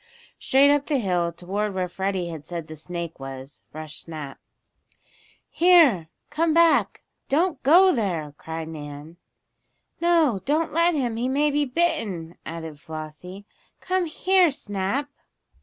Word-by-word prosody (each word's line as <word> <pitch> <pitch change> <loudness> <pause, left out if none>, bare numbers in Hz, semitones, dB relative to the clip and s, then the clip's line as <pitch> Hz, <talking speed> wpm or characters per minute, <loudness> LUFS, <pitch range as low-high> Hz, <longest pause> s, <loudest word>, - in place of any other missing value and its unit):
Straight 275 +2 +4
up 290 -1 +1
the 295 - +1
hill, 180 -7 0
toward 195 +4 -3
where 185 -1 -1
Freddie 190 -1 -2
had 160 -3 -7
said 170 0 -6
the 155 - -9
snake 170 0 -6
was, 135 +1 -9
rushed 155 0 -6
Snap. 150 -5 -8 1.1
"Here! 315 - +5 0.2
Come 325 0 +1
back! 335 -1 +3 0.3
Don't 325 +1 +1
go 360 +7 +6
there!" 170 - -2
cried 160 +1 -6
Nan. 150 +1 -9 0.8
"No, 325 - +3
don't 310 +3 0
let 335 +1 +3
him 245 -6 -1
he 245 +2 -1
may 290 +3 +2
be 290 0 +1
bitten!" 215 - -1
added 160 -2 -7
Flossie. 160 +5 -9 0.3
"Come 370 -1 0
here, 365 +2 +3
Snap!" 205 +2 -3
195 Hz, 135 wpm, -24 LUFS, -, 1.1 s, go